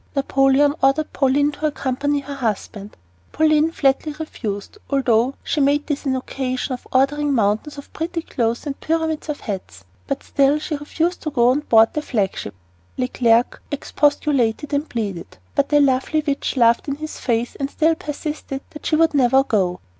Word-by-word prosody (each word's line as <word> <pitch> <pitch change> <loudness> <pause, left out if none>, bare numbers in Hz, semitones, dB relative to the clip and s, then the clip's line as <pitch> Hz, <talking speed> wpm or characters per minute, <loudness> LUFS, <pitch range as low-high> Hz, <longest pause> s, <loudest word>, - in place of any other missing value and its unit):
Napoleon 275 +1 +3
ordered 275 +3 +2
Pauline 285 +2 +2
to 300 +1 -2
accompany 285 0 -1
her 280 +1 -7
husband. 210 -5 -4 0.3
Pauline 310 +1 +3
flatly 285 0 +1
refused, 245 - -6
although 260 -2 +2
she 300 - -1
made 285 +1 +2
this 295 -1 -3
an 260 - +1
occasion 255 0 -3
for 250 - -15
ordering 280 +2 +2
"mountains 220 +7 0
of 280 - -11
pretty 335 0 -3
clothes 235 -3 -2
and 280 -2 -5
pyramids 320 -1 -1
of 295 - -3
hats." 95 - -6 0.2
But - - -3
still 280 +1 +2
she 305 +1 -5
refused 325 +4 -2
to 310 - -3
go 245 -4 +3
on 270 - +1
board 225 -6 +4
the 300 - -1
flag 210 -10 -1
ship. 100 - -6 0.4
Leclerc 245 -2 +2
expostulated 285 -2 0
and 285 +2 -1
pleaded, 200 - -4 0.2
but 280 - +1
the 295 - +4
lovely 280 +3 +2
witch 280 -2 -2
laughed 235 +1 +4
in 280 - -1
his 310 +1 -7
face 235 -1 -1
and 275 -1 -3
still 320 +2 +2
persisted 295 -2 -5
that 300 - -7
she 310 - +2
would 325 0 +3
never 265 -1 +4
go. 185 -8 0
275 Hz, 170 wpm, -21 LUFS, 245-295 Hz, 0.4 s, board